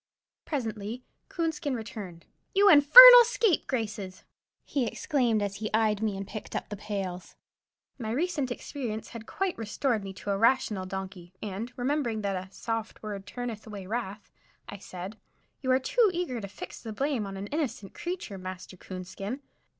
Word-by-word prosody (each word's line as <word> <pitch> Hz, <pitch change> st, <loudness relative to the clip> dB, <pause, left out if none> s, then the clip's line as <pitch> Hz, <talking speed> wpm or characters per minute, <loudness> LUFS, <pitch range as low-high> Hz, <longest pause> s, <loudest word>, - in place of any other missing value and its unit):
Presently 225 Hz, -4 st, -4 dB, 0.3 s
Coonskin 320 Hz, -5 st, -2 dB
returned. 205 Hz, -7 st, -8 dB, 0.3 s
"You 400 Hz, +1 st, +6 dB
infernal 485 Hz, +12 st, +12 dB
scapegraces!" 250 Hz, -, -1 dB, 0.4 s
he 265 Hz, -5 st, -1 dB
exclaimed, 235 Hz, -5 st, 0 dB
as 200 Hz, -1 st, -3 dB
he 215 Hz, 0 st, -4 dB
eyed 215 Hz, -2 st, +2 dB
me 210 Hz, -3 st, -1 dB
and 195 Hz, 0 st, -6 dB
picked 215 Hz, -, -8 dB
up -, -, -3 dB
the 210 Hz, -, -4 dB
pails. 195 Hz, -3 st, -5 dB, 0.6 s
My 220 Hz, -3 st, -4 dB
recent 290 Hz, +1 st, -1 dB
experience 245 Hz, -3 st, -5 dB
had 230 Hz, -2 st, -9 dB
quite 385 Hz, -2 st, -2 dB
restored 225 Hz, +1 st, -1 dB
me 195 Hz, -, -6 dB
to 200 Hz, +2 st, -5 dB
a 195 Hz, -, 0 dB
rational 215 Hz, -5 st, +2 dB
donkey, 185 Hz, -2 st, -7 dB
and, 210 Hz, +4 st, -5 dB
remembering 245 Hz, -4 st, -1 dB
that 200 Hz, -1 st, -1 dB
"a 185 Hz, +1 st, -6 dB
soft 225 Hz, +1 st, -5 dB
word 200 Hz, -2 st, -6 dB
turneth 235 Hz, -3 st, -6 dB
away 205 Hz, -3 st, -7 dB
wrath," 210 Hz, -1 st, -5 dB, 0.4 s
I 200 Hz, -, -8 dB
said, 185 Hz, +3 st, -8 dB, 0.4 s
"You 260 Hz, -, -3 dB
are 255 Hz, -, +5 dB
too 470 Hz, -, +3 dB
eager 340 Hz, -10 st, -3 dB
to 200 Hz, -, -5 dB
fix 195 Hz, -, -9 dB
the 220 Hz, -2 st, -6 dB
blame 265 Hz, -3 st, -1 dB
on 195 Hz, 0 st, -7 dB
an 195 Hz, -, -5 dB
innocent 235 Hz, -7 st, -3 dB
creature, 345 Hz, -, -5 dB
Master 185 Hz, 0 st, -8 dB
Coonskin. 190 Hz, +8 st, -7 dB
220 Hz, 160 wpm, -28 LUFS, 195-270 Hz, 0.6 s, infernal